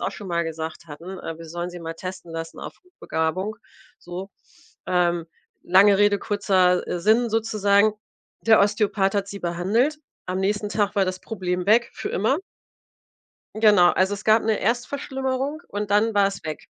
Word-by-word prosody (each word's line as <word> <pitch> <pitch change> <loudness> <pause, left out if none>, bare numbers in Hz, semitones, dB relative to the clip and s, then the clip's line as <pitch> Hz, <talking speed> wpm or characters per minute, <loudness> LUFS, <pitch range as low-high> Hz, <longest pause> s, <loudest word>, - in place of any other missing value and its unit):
auch - - -1
schon 200 -3 -9
mal 170 -1 0
gesagt 160 0 -6
hatten, 170 +5 -9
äh, 165 - -6
wir 165 - -9
sollen 175 +2 -4
sie 175 - -8
mal 165 0 -6
testen 185 -1 -8
lassen 165 0 -6
auf - - -8
Hochbegabung. 190 - -3 0.4
So, 180 +3 -8 0.6
ähm, 175 -2 +1 0.4
lange 195 +2 +5
Rede, 205 -1 +4
kurzer, 185 -3 +2
äh, 175 - -2
Sinn 225 +6 +3
sozusagen. 215 -1 +2 0.5
Der 225 -1 +5
Osteopath 205 -1 +1
hat 200 -1 -1
sie 200 -1 -7
behandelt. 205 - 0 0.3
Am 185 +1 -2
nächsten 205 +1 0
Tag 205 -2 0
war 195 - +4
das 185 0 -4
Problem 180 -4 -3
weg 235 +3 +4
für - - -5
immer. 225 - +1 1.2
Genau, 205 -5 +6
also, 190 +2 +1
es 205 - -9
gab 220 +1 +4
'ne 220 -1 +1
Erstverschlimmerung 265 - -2
und 205 0 -4
dann 220 +2 +3
war's 200 -1 +1
weg. 155 -1 -6
200 Hz, 165 wpm, -23 LUFS, 180-215 Hz, 1.2 s, Genau